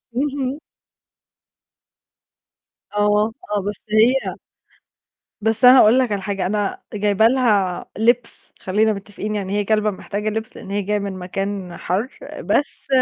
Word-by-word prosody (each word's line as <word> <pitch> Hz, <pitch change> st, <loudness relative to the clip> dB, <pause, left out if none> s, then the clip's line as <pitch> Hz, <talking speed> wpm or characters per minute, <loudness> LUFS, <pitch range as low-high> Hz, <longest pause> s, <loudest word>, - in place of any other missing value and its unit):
اهم. 275 Hz, 0 st, -1 dB, 2.3 s
آه، 210 Hz, +1 st, +2 dB, 0.2 s
آه، 205 Hz, -, +1 dB
بس 205 Hz, +1 st, -5 dB
هي 235 Hz, +5 st, +3 dB, 1.1 s
بس 225 Hz, +3 st, +3 dB
أنا 255 Hz, +1 st, +9 dB
أقول 230 Hz, +4 st, +6 dB
لك 250 Hz, -4 st, +1 dB
على 200 Hz, -1 st, -1 dB
حاجة 195 Hz, -2 st, -2 dB
أنا 205 Hz, +1 st, -1 dB
جايبة 210 Hz, +1 st, +3 dB
لها 210 Hz, -8 st, +1 dB
لبس 235 Hz, +3 st, +1 dB
خلينا 215 Hz, +3 st, +1 dB
متفقين 205 Hz, +1 st, -5 dB
يعني 200 Hz, -1 st, -3 dB
هي -, -, +1 dB
كلبة 215 Hz, 0 st, +2 dB
محتاجة 205 Hz, +2 st, -4 dB
لبس 220 Hz, +1 st, -5 dB
لأن 195 Hz, -, -9 dB
هي 205 Hz, 0 st, 0 dB
جاية 210 Hz, +2 st, -1 dB
من 200 Hz, -1 st, -4 dB
مكان 185 Hz, 0 st, -4 dB
حر، 200 Hz, +9 st, -2 dB, 0.3 s
بس 290 Hz, -, 0 dB
210 Hz, 135 wpm, -21 LUFS, 200-225 Hz, 2.3 s, أنا